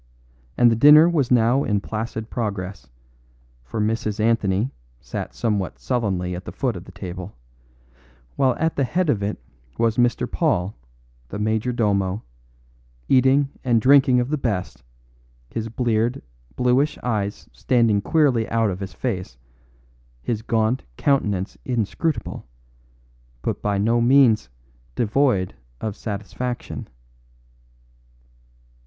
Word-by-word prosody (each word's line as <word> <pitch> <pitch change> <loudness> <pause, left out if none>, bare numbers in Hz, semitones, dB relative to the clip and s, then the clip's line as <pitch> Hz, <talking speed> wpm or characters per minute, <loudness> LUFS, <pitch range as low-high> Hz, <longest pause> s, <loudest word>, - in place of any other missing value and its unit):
And 120 -1 +6
the - - +2
dinner 150 +7 +8
was 150 -8 +1
now 125 +3 +3
in 105 -1 +1
placid 110 +2 -5
progress, 100 - -4 0.7
for - - -5
Mrs. 110 0 -1
Anthony 110 +1 +1 0.3
sat - - -6
somewhat 105 -5 -1
sullenly 95 -8 -1
at 90 +1 -6
the - - -6
foot 125 -5 -1
of 90 +1 -8
the 95 - -12
table, 95 0 -7 1.0
while 130 -2 +2
at 160 0 -1
the 140 - +2
head 170 +4 +1
of 105 - -1
it 100 +1 -2 0.4
was 115 -1 +1
Mr. 120 -1 +2
Paul, 90 +4 0 0.5
the 100 - -5
major 110 +3 0
domo, 100 -4 0 0.9
eating 135 +2 +4
and 120 -3 +3
drinking 130 +1 +5
of 125 +1 -1
the 155 -1 -1
best, 95 - -3 0.7
his 115 -1 -3
bleared, 115 +1 0 0.3
bluish 130 - +2
eyes 105 -4 -2
standing 115 -5 +2
queerly 135 -5 +2
out 115 -3 +1
of 90 - -5
his 95 -2 -6
face, 90 - -4 0.9
his 110 -3 -2
gaunt 110 +2 0
countenance 105 -9 0
inscrutable, 120 - -2 1.0
but - - -2
by 105 -1 0
no 115 +4 +2
means 120 - +4 0.5
devoid 115 -5 +1 0.3
of 110 -2 -4
satisfaction. 115 +4 -5
115 Hz, 125 wpm, -22 LUFS, 100-125 Hz, 1.0 s, dinner